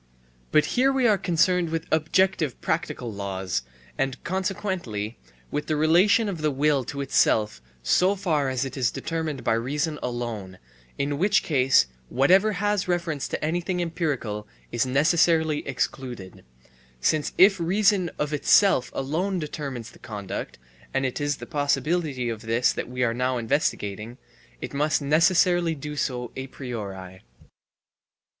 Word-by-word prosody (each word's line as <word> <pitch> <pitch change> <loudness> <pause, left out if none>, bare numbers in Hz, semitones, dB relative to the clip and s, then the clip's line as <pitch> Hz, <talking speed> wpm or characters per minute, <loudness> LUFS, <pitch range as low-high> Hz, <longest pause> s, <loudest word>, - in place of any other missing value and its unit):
But 155 - +4
here 260 +2 +3
we 265 -2 +1
are 210 -3 +3
concerned 180 -1 +2
with 165 0 -3
objective 160 -1 +1
practical 145 -8 -2
laws 95 -5 -3 0.4
and, 135 -1 0
consequently, 185 - -3 0.3
with 150 - -3
the 155 - 0
relation 180 +9 +4
of 180 -6 -4
the 155 - +2
will 145 0 +1
to 140 - -5
itself 105 - +2 0.2
so 185 - +3
far 160 -8 0
as 130 +1 -1
it 135 - -6
is 125 -3 +1
determined 160 -5 -4
by - - +2
reason 150 +7 -1
alone, 115 -6 -4 0.4
in 140 +1 -1
which 205 +4 +3
case 130 - +4 0.2
whatever 190 +11 +4
has 205 0 0
reference 170 -5 -1
to - - -3
anything 175 +3 -1
empirical 145 -11 -2 0.2
is 120 - 0
necessarily 160 +2 +3
excluded; 125 -7 -4 0.6
since 150 - +1
if 195 0 +6
reason 190 +1 +2
of 150 0 -2
itself 150 -1 +4
alone 170 +8 -1
determines 140 -7 -5
the - - -18
conduct 100 -3 -6 0.4
(and 135 0 +1
it 130 +2 -3
is 145 0 0
the - - -8
possibility 145 -2 0
of 115 -2 -4
this 115 +2 +1
that - - -5
we 125 0 -2
are 115 -2 +1
now 125 +1 0
investigating), 115 -3 -2 0.4
it - - -6
must 150 +2 +1
necessarily 165 +3 +3
do 150 +1 -6
so 125 -4 -2
a 130 0 -5
priori. 100 -9 -7
150 Hz, 145 wpm, -25 LUFS, 125-175 Hz, 0.6 s, if